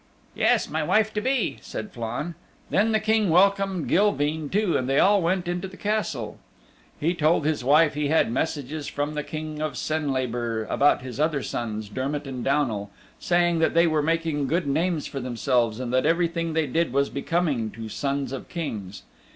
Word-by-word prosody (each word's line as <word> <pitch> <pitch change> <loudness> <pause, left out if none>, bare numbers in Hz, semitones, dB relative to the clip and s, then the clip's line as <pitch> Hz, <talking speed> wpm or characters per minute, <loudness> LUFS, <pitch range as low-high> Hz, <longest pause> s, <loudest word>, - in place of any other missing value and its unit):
"Yes, - - +2
my - - -2
wife 220 0 +2
to 210 - -1
be," 260 +1 0
said 210 - -6
Flann. 120 +7 -4 0.4
Then 215 +3 +3
the 220 - +3
King 215 -2 +2
welcomed 195 0 +3
Gilveen 160 -6 +1
too, 200 -3 +1
and 130 0 0
they 135 - +2
all 200 +3 +5
went 175 +1 0
into 175 +2 -2
the 190 - -13
Castle. 205 - -2 0.6
He 165 +4 +1
told 160 -2 +2
his 155 -4 0
wife 150 +4 +5
he 150 0 -1
had 155 -5 +2
messages 145 +2 -2
from 145 +1 -2
the 150 - -2
King 155 0 -6
of 155 -3 -2
Senlabor 125 -7 -1
about 145 -2 +3
his 130 0 -7
other 150 -2 +1
sons 110 -2 -4
Dermott 135 +7 -3
and 130 -3 -5
Downal, 120 -8 0 0.3
saying 175 -1 +2
that 160 - +1
they 170 +1 +6
were 155 -2 +2
making 160 -2 0
good 170 +5 0
names 160 +2 0
for 135 - -5
themselves, 120 -2 0
and 125 -1 -4
that 130 - +3
everything 170 -1 0
they 160 -1 +1
did 160 +2 0
was 140 +2 +1
becoming 140 -6 0
to 110 +1 -8
sons 140 +2 -2
of 135 - -6
Kings. 105 - -5
150 Hz, 185 wpm, -25 LUFS, 130-175 Hz, 0.6 s, they